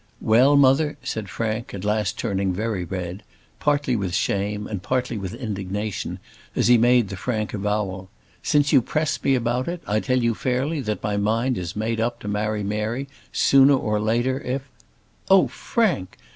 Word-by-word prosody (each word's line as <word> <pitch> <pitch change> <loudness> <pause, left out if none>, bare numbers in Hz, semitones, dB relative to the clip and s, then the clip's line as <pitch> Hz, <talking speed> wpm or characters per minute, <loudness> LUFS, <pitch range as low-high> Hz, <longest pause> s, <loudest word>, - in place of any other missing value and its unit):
"Well, 125 +6 +5
mother," 140 +2 +4
said 110 -3 -4
Frank, 110 +1 -3
at 100 0 -6
last 105 +1 0
turning 100 -4 -1
very 105 -1 -2
red, 90 +2 -5 0.4
partly 145 -3 +1
with 95 -5 -2
shame, 105 +2 -1
and 100 -4 -5
partly 125 +2 -1
with 100 0 -5
indignation, 105 -3 -4 0.4
as - - +2
he 125 - +8
made 120 -2 +4
the 95 - -5
frank 110 +1 -3
avowal, 100 -2 -2 0.3
"since 145 0 +2
you 135 - +7
press 155 +5 -1
me 135 - +3
about 120 +1 -1
it, 175 0 -4
I 105 +1 +1
tell 130 +3 0
you 115 0 +2
fairly 135 +6 -1
that 110 -4 -3
my 105 -1 -1
mind 115 +5 +1
is 90 -3 -5
made 110 +2 -1
up 120 +2 -1
to - - -7
marry 105 0 -1
Mary 110 +6 -2 0.2
sooner 135 +1 +5
or 105 -5 0
later, 120 +5 +1
if 130 +1 -3 0.4
" - - -37 0.2
"Oh, 195 -1 +6
Frank! 190 - -1
110 Hz, 175 wpm, -23 LUFS, 105-130 Hz, 0.4 s, he